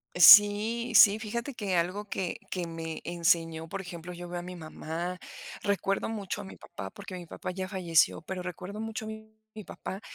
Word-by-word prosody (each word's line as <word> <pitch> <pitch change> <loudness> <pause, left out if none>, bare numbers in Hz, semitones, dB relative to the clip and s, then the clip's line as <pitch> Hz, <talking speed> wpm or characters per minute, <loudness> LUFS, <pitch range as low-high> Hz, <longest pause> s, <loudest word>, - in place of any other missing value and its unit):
Sí, 215 +4 +7
sí, 210 0 +8
fíjate 235 +5 -4
que 205 -6 -2
algo 180 +5 -1
que 185 -2 -3
que 180 -2 -3
me 165 -1 -6
enseñó, 165 -1 +1
por 195 - -4
ejemplo, 175 -2 -8
yo 175 0 -8
veo 175 0 -4
a - - -5
mi 180 +1 -8
mamá. 170 +2 -5 0.4
Recuerdo 200 0 0
mucho 205 -5 -4
a - - -8
mi 95 -1 -11
papá, 95 - -8
porque 185 - -10
mi 180 -2 -7
papá 180 - -6
ya 185 +1 -4
falleció, 175 -5 +2
pero 185 +1 -5
recuerdo 180 +3 -7
mucho 220 0 -4
a - - -7
mi 220 0 -11
papá. 195 - -7
185 Hz, 190 wpm, -29 LUFS, 170-210 Hz, 0.4 s, sí